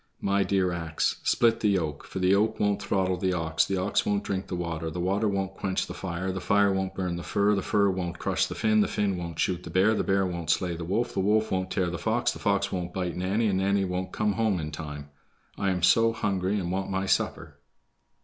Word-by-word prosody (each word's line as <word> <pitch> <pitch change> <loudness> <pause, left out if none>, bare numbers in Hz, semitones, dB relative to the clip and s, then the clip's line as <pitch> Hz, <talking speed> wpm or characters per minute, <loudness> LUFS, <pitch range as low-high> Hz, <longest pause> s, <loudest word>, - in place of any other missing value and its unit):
"My 100 0 +1
dear 95 -2 +1
ax, 80 -2 -2
split 115 -1 +3
the 105 - +2
yoke, 80 -7 -1
for - - -8
the 90 -1 +2
yoke 105 +3 +2
won't 105 -1 +1
throttle 95 -1 0
the 95 +1 0
ox, 80 -2 +1
the 95 - -1
ox 95 +3 +1
won't 100 0 0
drink 95 0 -3
the - - -4
water, 85 -2 -3
the 80 - -5
water 100 +5 +1
won't 95 -1 -1
quench 95 -1 -2
the - - -7
fire, 90 0 -3
the 95 0 -4
fire 100 +1 +3
won't 95 0 -2
burn 90 -3 -2
the - - -5
fir, 100 +3 +1
the 100 - 0
fir 100 0 +2
won't 90 -2 -3
crush - - 0
the - - -6
Finn, 110 -1 +3
the - - +2
Finn 100 -2 0
won't 85 -2 -6
shoot 90 0 0
the - - -9
bear, 95 +4 +3
the - - 0
bear 95 0 +2
won't 85 -3 -4
slay 90 -2 +1
the 85 0 -6
wolf, 110 +8 -1
the - - -2
wolf 105 +3 +2
won't 95 0 -1
tear 90 -3 0
the 85 - -4
fox, 115 +2 +1
the - - -8
fox 100 -1 +1
won't 90 -1 -4
bite 90 -2 -2
Nanny, 95 +5 0
and 95 -3 +1
Nanny 100 0 +2
won't 90 0 -3
come 105 -1 0
home 110 -4 +1
in 75 -1 -4
time, 75 -2 -7 0.4
I 100 - 0
am 90 -2 -1
so 115 +5 +5
hungry 100 -2 -1
and 90 -2 -3
want 95 +1 -2
my 95 0 -1
supper." - - -1
95 Hz, 245 wpm, -27 LUFS, 90-100 Hz, 0.4 s, so